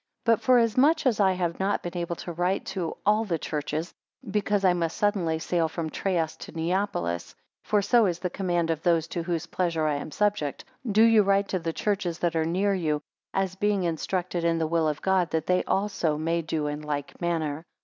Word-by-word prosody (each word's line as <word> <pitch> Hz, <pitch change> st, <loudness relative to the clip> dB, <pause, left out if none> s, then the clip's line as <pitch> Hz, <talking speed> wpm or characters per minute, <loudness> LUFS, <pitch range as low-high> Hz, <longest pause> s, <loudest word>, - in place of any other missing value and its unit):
6 -, -, -48 dB
But 230 Hz, -2 st, +3 dB
forasmuch 255 Hz, +6 st, +4 dB
as 245 Hz, -5 st, +2 dB
I 190 Hz, -2 st, +4 dB
have 175 Hz, -2 st, -2 dB
not 195 Hz, +1 st, 0 dB
been 175 Hz, +1 st, -5 dB
able 170 Hz, -1 st, -2 dB
to 175 Hz, -, -7 dB
write 180 Hz, +3 st, -1 dB
to 180 Hz, -4 st, -3 dB
all 210 Hz, +2 st, +4 dB
the 180 Hz, -7 st, -1 dB
churches, 155 Hz, +2 st, -3 dB, 0.4 s
because 205 Hz, -1 st, +1 dB
I 180 Hz, -, +5 dB
must 170 Hz, -2 st, -2 dB
suddenly 195 Hz, -7 st, +1 dB
sail 165 Hz, 0 st, 0 dB
from 160 Hz, -1 st, -4 dB
Troas 170 Hz, -5 st, -1 dB
to -, -, -9 dB
Neapolis; 165 Hz, -, -2 dB, 0.3 s
(for 205 Hz, -1 st, +2 dB
so 225 Hz, +1 st, +4 dB
is 175 Hz, -2 st, -1 dB
the 180 Hz, 0 st, -3 dB
command 175 Hz, -3 st, 0 dB
of 160 Hz, -1 st, -2 dB
those 165 Hz, -2 st, +2 dB
to 170 Hz, -, -3 dB
whose 170 Hz, -1 st, -2 dB
pleasure 165 Hz, -2 st, -1 dB
I 150 Hz, -2 st, +1 dB
am 145 Hz, -, -6 dB
subject;) 205 Hz, -6 st, -1 dB, 0.3 s
do 215 Hz, +2 st, +5 dB
you 225 Hz, -1 st, +6 dB
write 200 Hz, 0 st, +2 dB
to 185 Hz, -, 0 dB
the 165 Hz, -1 st, -2 dB
churches 190 Hz, -2 st, -1 dB
that 170 Hz, -2 st, -1 dB
are 160 Hz, -1 st, +1 dB
near 190 Hz, +5 st, +1 dB
you, 155 Hz, -5 st, -1 dB, 0.3 s
as 195 Hz, -1 st, -1 dB
being 200 Hz, 0 st, 0 dB
instructed 175 Hz, +1 st, -2 dB
in 165 Hz, 0 st, +2 dB
the 165 Hz, -, 0 dB
will 160 Hz, 0 st, +1 dB
of 150 Hz, -1 st, -3 dB
God, 190 Hz, -3 st, +2 dB
that 160 Hz, -1 st, -1 dB
they 180 Hz, 0 st, +2 dB
also 190 Hz, -6 st, 0 dB
may 165 Hz, +2 st, 0 dB
do 160 Hz, -1 st, -2 dB
in 150 Hz, 0 st, -3 dB
like 145 Hz, 0 st, -5 dB
manner. 160 Hz, -3 st, -1 dB
175 Hz, 210 wpm, -26 LUFS, 160-195 Hz, 0.4 s, you